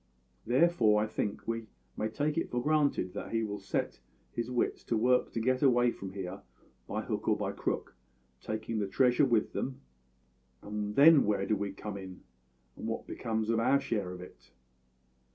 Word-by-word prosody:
Therefore 120 -5 +4
I - - 0
think 105 -1 -3
we 115 -1 -3 0.3
may 110 - -1
take 145 +6 -1
it 165 - -1
for 125 - -1
granted 145 -9 +1
that - - -6
he 115 0 +1
will 105 -1 -3
set 95 - -2 0.3
his 120 +1 -3
wits 125 -1 -1
to 115 - 0
work 125 +3 +3
to - - -1
get 130 +3 +1
away 120 -3 +4
from 95 -3 -8
here 95 -2 -6 0.5
by - - -3
hook - - -3
or - - +3
by - - -2
crook, - - -3 0.5
taking 110 +1 -3
the 100 - -1
treasure 125 +6 +4
with 115 -5 +1
them; 130 -1 -3 0.8
and 105 0 -4
then 150 +1 +8
where 100 -2 +1
do 110 - +1
we 100 0 -3
come 100 +1 -6
in, 95 -2 -9 0.5
and - - -6
what - - -3
becomes 110 -1 -2
of 115 - +2
our 135 +4 +4
share 110 -9 -2
of 90 0 -7
it? 90 - -14
115 Hz, 185 wpm, -31 LUFS, 105-125 Hz, 0.8 s, then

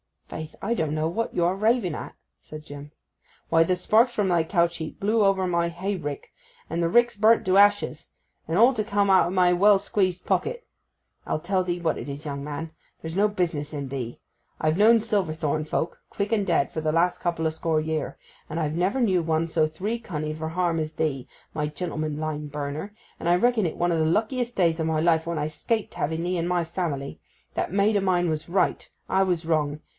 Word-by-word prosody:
'Faith, 155 -1 -7
I 220 +4 0
don't 160 -7 -1
know 155 +1 0
what 230 +7 -3
you 175 - +2
are 175 +2 +2
raving 215 -4 +2
at,' - - -7 0.3
said 155 0 -10
Jim. 145 0 -10 0.6
'Why—the 165 +2 +4
sparks 225 +7 +3
from 205 -3 0
thy 170 -2 +3
couch 170 -1 +1
heap 160 -1 -7
blew 215 +2 +2
over 195 -1 +3
upon 185 -1 -1
my 170 0 +1
hay 190 +4 -3
rick, 145 -4 -6 0.4
and 165 +2 -2
the 170 - +2
rick's 240 +2 +3
burnt 220 +2 +4
to 185 +1 +3
ashes; 205 -6 +3 0.4
and 165 - 0
all 240 +5 +6
to 215 - 0
come 205 -1 +1
out 190 - +5
o' - - -2
my 180 -1 +3
well 200 +3 +5
squeezed 185 -2 -1
pocket. 480 +1 -1 0.6
I'll 155 - -1
tell 185 +1 0
thee 175 -1 -2
what 160 -2 0
it 120 - -6
is, 140 +2 -7
young 140 -1 -4
man. 150 +2 -5 0.3
There's 160 +2 -5
no 205 +1 +4
business 165 -7 -2
in 140 -2 -4
thee. 125 -3 -5 0.4
I've 155 +1 +1
known 225 +2 +6
Silverthorn 160 -8 -1
folk, 160 +2 -3
quick 200 +1 -3
and 205 -3 +1
dead, 165 -5 +2
for - - -3
the 155 -1 -1
last 175 +2 +2
couple 170 -2 -1
o' - - +3
score 160 0 -1
year, 155 -1 -3 0.3
and 155 - -4
I've 155 -2 -1
never 185 +10 0
knew 190 -7 +3
one 165 0 0
so 160 -1 +2
three 200 +9 -3
cunning 155 -8 -4
for 160 0 -4
harm 170 -1 0
as 155 0 -3
thee, 145 -5 -2 0.3
my 150 -1 -1
gentleman 155 -1 -4
lime 150 -1 -3
burner; 150 +7 -5 0.2
and - - -4
I 175 - +5
reckon 230 +2 +2
it 160 - -3
one 175 0 +1
o' 165 - +1
the 160 - +2
luckiest 235 +8 0
days 170 -3 +2
o' 160 - 0
my 160 -1 0
life 165 -1 +2
when 170 -1 -2
I 150 0 -1
'scaped 220 +8 -2
having 160 +3 -2
thee 180 +1 -1
in 170 0 -1
my 175 -1 +1
family. 160 -5 -4 0.3
That - - -2
maid 205 +2 +3
of 195 - 0
mine 175 -2 +2
was 155 0 -3
right; 190 +2 0 0.2
I 190 0 +3
was 175 -3 -1
wrong. 150 -2 0
170 Hz, 220 wpm, -25 LUFS, 155-195 Hz, 0.6 s, all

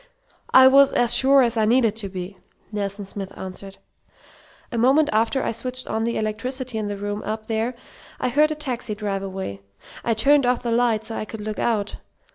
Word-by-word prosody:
"I 260 - +8
was 275 +1 +6
as 240 -1 +3
sure 270 0 +5
as 235 -1 +1
I 220 - +3
needed 230 -1 +3
to 200 -3 -4
be," 185 +1 -7 0.4
Nelson 200 -1 -4
Smith 195 0 -7
answered. 195 +1 -8 0.9
"A 235 - -3
moment 275 +6 +4
after 225 +5 +1
I - - -1
switched 255 +3 -3
on 220 +1 -2
the 235 - -1
electricity 235 +3 -2
in 210 - -3
the 205 -1 -4
room 205 +1 -4
up 215 +1 -4
there 225 +2 -2 0.4
I - - 0
heard 300 +5 +3
a 310 - -2
taxi 250 -7 -3
drive 200 -2 -3
away. 190 - -6 0.4
I 230 - +1
turned 275 +4 +4
off 250 -1 +1
the 235 - -1
light 230 -2 +2
so 225 - -6
I - - -3
could 220 0 -8
look 215 0 -5
out. 210 -3 -1
225 Hz, 200 wpm, -23 LUFS, 205-250 Hz, 0.9 s, I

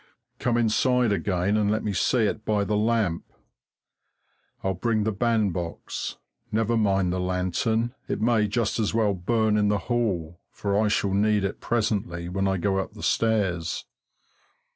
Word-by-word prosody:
Come 120 -1 +1
inside 120 +1 +2
again 100 0 0
and 105 -1 +2
let 110 +1 0
me 105 - -1
see 115 +6 +2
it 105 +1 -1
by 105 -1 +1
the 105 +1 -1
lamp. 105 -5 +1 1.4
I'll 95 - 0
bring 110 +4 0
the 110 - 0
bandbox 100 -6 -2 0.3
never 110 +2 +1
mind 100 -5 +2
the 90 - -1
lantern, 95 +6 0
it - - -2
may 110 -1 +2
just 110 +2 -1
as 110 0 0
well 110 -3 +2
burn 110 +3 +1
in 105 -1 +3
the 105 0 +2
hall, 95 -9 -2
for 100 -1 -2
I 105 +1 +3
shall 100 -2 +1
need 105 0 +2
it 100 +1 -3
presently 100 -7 -1
when 95 +2 0
I 95 0 +1
go 95 +2 0
up 95 - -4
the - - -9
stairs. 100 -7 0
105 Hz, 165 wpm, -25 LUFS, 95-110 Hz, 1.4 s, in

